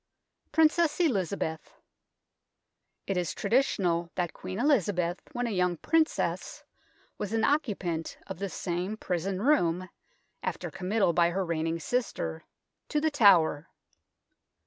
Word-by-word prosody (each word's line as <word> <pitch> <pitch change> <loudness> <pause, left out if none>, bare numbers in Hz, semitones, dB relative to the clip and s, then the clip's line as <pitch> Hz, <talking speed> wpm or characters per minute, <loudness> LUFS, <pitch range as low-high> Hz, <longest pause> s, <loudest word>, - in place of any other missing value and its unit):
PRINCESS 320 0 +3
ELIZABETH 195 - -1 1.3
It 195 - -1
is 175 -2 -1
traditional 195 -7 +1
that 175 -2 -1
Queen 185 +1 -6
Elizabeth, 200 - +1
when 245 0 -1
a 235 - -2
young 180 -3 +1
princess, 325 - 0 0.6
was 210 +1 -3
an 225 0 +1
occupant 195 - -1
of - - -7
this 195 -4 -4
same 180 +4 -3
prison 185 +1 -2
room 185 - +2 0.5
after - - -4
committal 190 -1 +1
by 170 0 +4
her 190 +2 -1
reigning 165 0 -1
sister 155 - -2 0.5
to 300 - +1
The 315 +1 +1
Tower. 175 - +5
190 Hz, 120 wpm, -29 LUFS, 170-240 Hz, 1.3 s, Tower